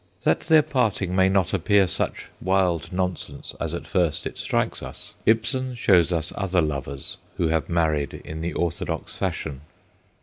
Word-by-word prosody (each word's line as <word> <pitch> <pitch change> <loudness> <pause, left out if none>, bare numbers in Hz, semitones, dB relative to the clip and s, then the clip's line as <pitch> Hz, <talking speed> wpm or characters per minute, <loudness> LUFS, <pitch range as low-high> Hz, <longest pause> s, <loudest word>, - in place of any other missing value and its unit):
That - - +3
their 160 -2 +5
parting 105 -10 0
may 95 0 +5
not 95 -2 +2
appear 100 +2 +4
such 90 - -2 0.2
wild 95 -3 +1
nonsense 90 -6 -3
as - - -2
at - - -6
first 85 -5 +1
it - - -4
strikes - - -1
us, - - -8
Ibsen 120 +3 +2
shows 90 -7 +4
us 80 -2 0
other 95 -2 +1
lovers 70 -3 -1 0.2
who 80 - +1
have 80 -1 0
married 80 -5 +1
in 80 0 -6
the 85 +1 -2
orthodox 85 +3 -2
fashion. 80 -8 -3
90 Hz, 160 wpm, -24 LUFS, 80-100 Hz, 0.2 s, their